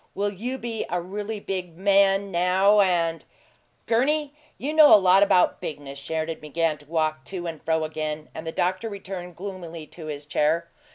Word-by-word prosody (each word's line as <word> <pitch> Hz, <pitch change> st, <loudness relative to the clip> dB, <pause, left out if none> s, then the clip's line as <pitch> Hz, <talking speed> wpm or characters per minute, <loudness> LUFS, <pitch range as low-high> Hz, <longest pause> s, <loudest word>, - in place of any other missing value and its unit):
"Will 205 Hz, +1 st, 0 dB
you 245 Hz, +7 st, -4 dB
be 235 Hz, -3 st, -4 dB
a 180 Hz, -, 0 dB
really 205 Hz, +4 st, -5 dB
big 180 Hz, -4 st, -5 dB
man 195 Hz, 0 st, +3 dB
now 190 Hz, +4 st, +4 dB
and 170 Hz, -3 st, +1 dB, 0.3 s
" -, -, -39 dB
"Gurney, 285 Hz, +5 st, +1 dB, 0.2 s
you 290 Hz, +4 st, -3 dB
know 310 Hz, -2 st, +8 dB
a -, -, +11 dB
lot 190 Hz, 0 st, +5 dB
about 185 Hz, -3 st, +3 dB
bigness!" 140 Hz, -2 st, -6 dB
Sheridan 160 Hz, +2 st, -3 dB
began 155 Hz, 0 st, -1 dB
to 145 Hz, -, -18 dB
walk 155 Hz, -1 st, -1 dB
to 185 Hz, -2 st, -6 dB
and 165 Hz, -3 st, -5 dB
fro 160 Hz, 0 st, +1 dB
again, 155 Hz, -1 st, -4 dB
and 160 Hz, +1 st, -7 dB
the -, -, -2 dB
doctor 185 Hz, +7 st, -1 dB
returned 185 Hz, -3 st, -7 dB
gloomily 170 Hz, -4 st, -7 dB
to 155 Hz, +1 st, -10 dB
his 145 Hz, -1 st, -5 dB
chair. 155 Hz, +3 st, 0 dB
180 Hz, 180 wpm, -25 LUFS, 160-200 Hz, 0.3 s, a